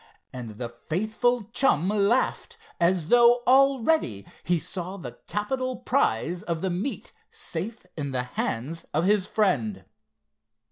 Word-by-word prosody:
and 115 -5 -7
the 120 - -3
faithful 215 - -1
chum 180 - +3
laughed, 210 +4 +1 0.2
as 170 -1 +2
though 240 0 +6
already 265 - +3 0.2
he 175 0 +2
saw 180 +3 -4
the 175 - -9
capital 255 +5 -2
prize 175 - 0
of 165 -2 -3
the 190 - -1
meet 195 +10 -4 0.2
safe 190 +6 -4
in 140 -3 -3
the 125 -1 -1
hands 125 +5 -3
of 160 +3 +2
his 200 -1 +2
friend. 115 - 0
185 Hz, 130 wpm, -26 LUFS, 150-235 Hz, 0.2 s, though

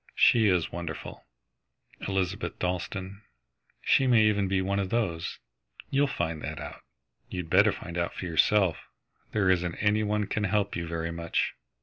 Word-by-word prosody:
She 115 -3 +5
is 90 -4 +2
wonderful, 85 -2 -7 0.8
Elizabeth 95 +1 -2
Dalstan. 95 +2 -3 0.6
She 135 - +4
may 120 -3 +5
even 105 -2 +2
be 95 0 +1
one 100 +1 0
of 95 -2 -1
those. 85 -8 -1 0.5
You'll 140 +1 +3
find 80 - -2
that - - -5
out. - - -8 0.5
You'd 90 -3 -5
better 105 +3 +6
find 85 -2 -6
out 85 - -2
for - - -5
yourself. 90 +2 +3 0.5
There 105 -3 +1
isn't 90 -2 0
any 105 +1 +2
one 105 0 0
can 105 +1 -1
help 100 0 0
you 85 -1 -3
very 85 0 -3
much." 85 0 -1
95 Hz, 155 wpm, -28 LUFS, 85-105 Hz, 0.8 s, better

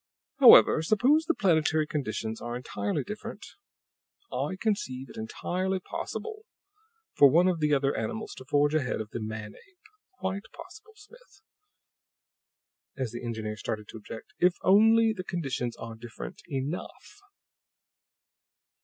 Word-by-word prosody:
"However, 245 - +8
suppose 255 - +3
the 335 - +1
planetary 160 -4 +2
conditions 110 -7 -4
are 120 0 -4
entirely 100 -5 -3
different. 210 +1 -7 0.9
I 190 - -2
conceive 135 - -2
it - - -14
entirely 185 +12 -2
possible 435 - -6 0.7
for 140 - +7
one 170 +6 +4
of 180 -3 +1
the 150 -1 +1
other 135 0 +1
animals 220 -2 -4
to 130 - -10
forge 145 +2 +2
ahead 140 -5 0
of 110 -1 -6
the - - -4
man 110 -1 -6
ape; 395 -3 -21 0.4
quite 195 +2 -3
possible, 430 +6 -13
Smith," 475 +4 -19 1.5
as 130 -4 -2
the 120 +1 -7
engineer 110 -2 -4
started 105 -1 -4
to - - -8
object, 110 +9 -10
"if 180 0 +4
only 225 +3 +5
the 185 -4 -6
conditions 135 -10 -3
are 115 0 -7
different 110 - -9
ENOUGH. 140 - -5
155 Hz, 135 wpm, -28 LUFS, -, 1.5 s, However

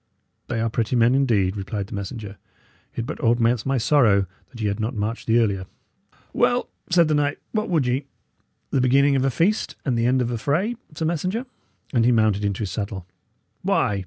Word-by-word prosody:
"They 120 -2 -2
are 115 - +1
pretty 115 +2 0
men, 120 +1 +4
indeed," 110 -9 +2
replied 100 0 -4
the - - -11
messenger. 100 0 -6 0.6
"It 120 - -3
but 155 - -6
augments 120 -1 +2
my 135 0 +1
sorrow 115 -6 +4 0.2
that 120 - -13
ye 105 - 0
had 100 +2 -2
not 110 +4 -2
marched 110 +2 -3
the 115 +1 +4
earlier." 100 -5 +1 0.7
"Well," - - +2 0.2
said 170 -2 +4
the 155 - +1
knight, 145 -1 +1
"what 215 0 -1
would 160 -7 +2
ye? 130 +3 -1 0.6
The 135 - +2
beginning 140 +2 +4
of 130 - +2
a 135 - +3
feast 185 - 0
and 130 -4 +1
the 115 0 +1
end 130 +1 +3
of 120 -1 0
a 120 - -2
fray, 180 - 0 0.2
sir 160 - -2
messenger;" 185 - -1 0.5
and 120 -3 +3
he 120 - +4
mounted 110 -3 +2
into 100 0 -1
his 100 -4 -2
saddle. 100 -2 -4 0.6
"Why! 100 -1 +1
120 Hz, 200 wpm, -23 LUFS, 105-140 Hz, 0.7 s, men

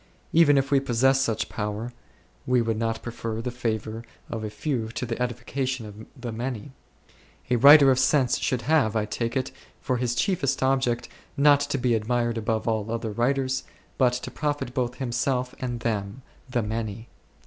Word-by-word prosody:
Even 155 -3 +6
if 135 +1 0
we 140 - +5
possessed 135 +1 +2
such 110 -2 -1
power, 105 +3 -4 0.5
we 125 0 +3
would 115 -2 0
not 115 -1 -2
prefer 115 -2 -4
the 120 +2 -3
favour 115 -2 -3 0.3
of 115 - -3
the 110 - -4
few 110 +2 -2
to 120 +2 -4
the 115 +1 -4
edification 125 +1 -2
of 105 +1 -10
the 120 -1 -5
many. 120 +2 -4 0.8
A 125 - +4
writer 140 +2 +9
of 130 - +2
sense 130 -1 +3
should 125 -2 -1
have, 135 -7 +2
I 110 -1 +1
take 115 +3 -2
it, 130 0 -2 0.3
for 130 -2 -1
his 120 0 -1
chiefest 140 -7 0
object 130 -3 +1 0.3
not 145 0 +6
to 145 0 -1
be 125 -2 +2
ad 110 -1 -3
mired 120 -1 0
above 110 +1 -1
all 110 -1 0
other 115 -1 -2
writers, 130 +3 0 0.4
but 125 -2 +4
to 125 - -4
profit 145 -4 -2
both 125 -1 -1
himself 125 0 -1
and 120 -2 -4
them, 110 +1 -3 0.3
the 120 -2 0
many. 110 +1 -4
120 Hz, 180 wpm, -25 LUFS, 115-130 Hz, 0.8 s, writer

